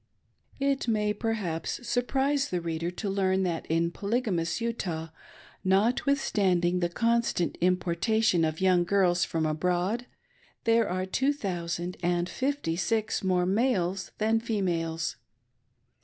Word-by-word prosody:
It 275 Hz, -2 st, 0 dB
may, 210 Hz, -2 st, +1 dB
perhaps, 210 Hz, -2 st, -3 dB
surprise 270 Hz, +3 st, +1 dB
the 180 Hz, -, -1 dB
reader 165 Hz, 0 st, -2 dB
to 180 Hz, +4 st, -5 dB
learn 190 Hz, -1 st, +1 dB
that 170 Hz, -3 st, -2 dB
in 165 Hz, +1 st, +1 dB
poly 205 Hz, +7 st, 0 dB
gamous 170 Hz, -5 st, -1 dB
Ut?ih, 175 Hz, -9 st, -3 dB, 0.5 s
notwithstanding 190 Hz, -4 st, +2 dB
the 175 Hz, -1 st, 0 dB
constant 230 Hz, -3 st, +1 dB
importation 180 Hz, +2 st, +2 dB
of 155 Hz, 0 st, -1 dB
young 185 Hz, -2 st, +4 dB
girls 180 Hz, -1 st, +2 dB
from 160 Hz, -1 st, -1 dB
abroad, 180 Hz, +9 st, 0 dB, 0.6 s
there 230 Hz, -2 st, +3 dB
are 185 Hz, +1 st, -1 dB
two 265 Hz, +9 st, +1 dB
thousand 175 Hz, -, -3 dB
and 175 Hz, 0 st, +1 dB
fifty 265 Hz, -, -1 dB
six 215 Hz, +4 st, 0 dB
more 180 Hz, -1 st, +2 dB
males 195 Hz, -3 st, 0 dB
than 220 Hz, +1 st, +2 dB
females. 170 Hz, -8 st, -1 dB
185 Hz, 125 wpm, -28 LUFS, 175-225 Hz, 0.6 s, young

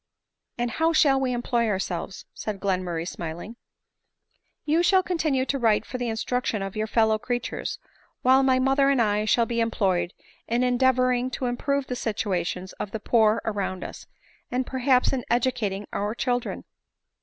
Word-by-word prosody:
" -, -, -58 dB
And 240 Hz, -1 st, -1 dB
how 325 Hz, +6 st, +1 dB
shall 280 Hz, -4 st, +4 dB
we 260 Hz, -1 st, 0 dB
employ 240 Hz, -1 st, 0 dB
ourselves?" 190 Hz, -2 st, -3 dB
said 210 Hz, -2 st, -5 dB
Glenmur 185 Hz, -3 st, -1 dB
ray 165 Hz, +1 st, -2 dB
smiling. 175 Hz, +7 st, -6 dB, 0.6 s
" -, -, -48 dB
You 315 Hz, +3 st, +3 dB
shall 375 Hz, +2 st, +4 dB
continue 310 Hz, -7 st, 0 dB
to 275 Hz, 0 st, -1 dB
write 225 Hz, -3 st, +2 dB
for 255 Hz, -, -6 dB
the 245 Hz, -1 st, -1 dB
instruction 225 Hz, -1 st, -1 dB
of 195 Hz, -1 st, -6 dB
your 215 Hz, 0 st, -1 dB
fellow 220 Hz, -1 st, +2 dB
creatures; 245 Hz, +1 st, -3 dB, 0.5 s
while 260 Hz, +1 st, +6 dB
my 265 Hz, -1 st, +3 dB
mother 270 Hz, +1 st, +3 dB
and 275 Hz, -2 st, +3 dB
I 210 Hz, -2 st, +2 dB
shall 230 Hz, +2 st, +3 dB
be 235 Hz, 0 st, -2 dB
employed 190 Hz, -6 st, 0 dB, 0.3 s
in 240 Hz, +2 st, +1 dB
endeavoring 255 Hz, 0 st, +2 dB
to 260 Hz, -, -3 dB
improve 280 Hz, +3 st, -1 dB
the 250 Hz, -, -4 dB
situation 190 Hz, -6 st, -2 dB
of 210 Hz, -, -3 dB
the 220 Hz, -, -5 dB
poor 220 Hz, 0 st, +3 dB
around 200 Hz, -3 st, -2 dB
us, -, -, -9 dB, 0.4 s
and 250 Hz, +1 st, -1 dB
perhaps 260 Hz, 0 st, +2 dB
in 255 Hz, -2 st, -1 dB
educating 230 Hz, -5 st, 0 dB
our 205 Hz, +2 st, -2 dB
children." 245 Hz, -1 st, -2 dB
240 Hz, 170 wpm, -25 LUFS, 210-260 Hz, 0.6 s, while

